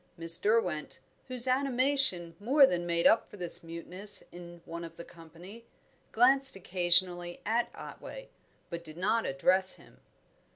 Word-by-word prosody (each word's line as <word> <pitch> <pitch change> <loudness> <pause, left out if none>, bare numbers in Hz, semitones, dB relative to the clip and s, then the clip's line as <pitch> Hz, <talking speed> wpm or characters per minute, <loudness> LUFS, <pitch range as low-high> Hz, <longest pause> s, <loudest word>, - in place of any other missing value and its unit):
Miss 165 0 +5
Derwent, 210 -8 -2 0.3
whose 255 -1 +2
animation 255 -9 0
more 270 +7 +4
than 175 -7 -3
made 170 0 -2
up 225 - +2
for - - -14
this 175 -2 -4
muteness 175 +5 -2
in 175 -1 -13
one 170 +1 -9
of 165 0 -12
the 170 - -11
company, 175 +7 -15 0.5
glanced 270 +3 +5
occasionally 175 -1 0
at 230 +3 -1
Otway, - - -11 0.4
but 170 0 -7
did 155 -1 -13
not 215 +5 -1
address 185 +8 +1
him. - - -21
180 Hz, 140 wpm, -28 LUFS, 170-235 Hz, 0.5 s, Miss